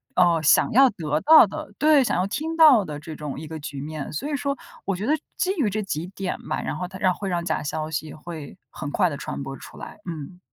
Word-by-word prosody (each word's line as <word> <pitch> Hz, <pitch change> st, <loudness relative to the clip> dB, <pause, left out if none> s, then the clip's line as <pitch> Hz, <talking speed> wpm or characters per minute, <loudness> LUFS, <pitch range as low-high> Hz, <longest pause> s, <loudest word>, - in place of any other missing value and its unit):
呃， 170 Hz, -3 st, +4 dB
想 145 Hz, -, +4 dB
要 265 Hz, +2 st, +6 dB
得 155 Hz, -7 st, -2 dB
到 315 Hz, -5 st, +8 dB
的， 200 Hz, +1 st, -7 dB
对， 300 Hz, -3 st, +5 dB
想 -, -, 0 dB
要 185 Hz, -, +1 dB
听 320 Hz, +9 st, -3 dB
到 285 Hz, -10 st, +8 dB
的 150 Hz, -1 st, -6 dB
这 155 Hz, +1 st, -8 dB
种 150 Hz, -2 st, -6 dB
一 160 Hz, -, -7 dB
个 160 Hz, 0 st, -6 dB
局 145 Hz, -2 st, -6 dB
面， 150 Hz, -1 st, -6 dB
所 225 Hz, -, -3 dB
以 295 Hz, -, -1 dB
说 280 Hz, +1 st, -2 dB, 0.3 s
我 195 Hz, -, 0 dB
觉 200 Hz, +4 st, -4 dB
得 295 Hz, -, +2 dB, 0.2 s
基 375 Hz, -, +1 dB
于 225 Hz, -7 st, +2 dB
这 215 Hz, +2 st, -2 dB
几 170 Hz, -2 st, -3 dB
点 190 Hz, -1 st, -4 dB
吧， -, -, -1 dB
然 -, -, -3 dB
后 180 Hz, -, -3 dB
它 190 Hz, 0 st, -9 dB
让 185 Hz, -1 st, +2 dB
会 195 Hz, +1 st, -5 dB
让 170 Hz, -1 st, -1 dB
假 160 Hz, -, -1 dB
消 155 Hz, +1 st, -3 dB
息 155 Hz, -1 st, -4 dB
会 155 Hz, -2 st, -9 dB
很 145 Hz, -, -6 dB
快 180 Hz, +2 st, +2 dB
地 145 Hz, -, -5 dB
传 140 Hz, -, -5 dB
播 135 Hz, 0 st, -6 dB
出 -, -, -12 dB
来， -, -, -9 dB
嗯。 165 Hz, +3 st, -7 dB
175 Hz, 275 characters per minute, -24 LUFS, 155-215 Hz, 0.3 s, 到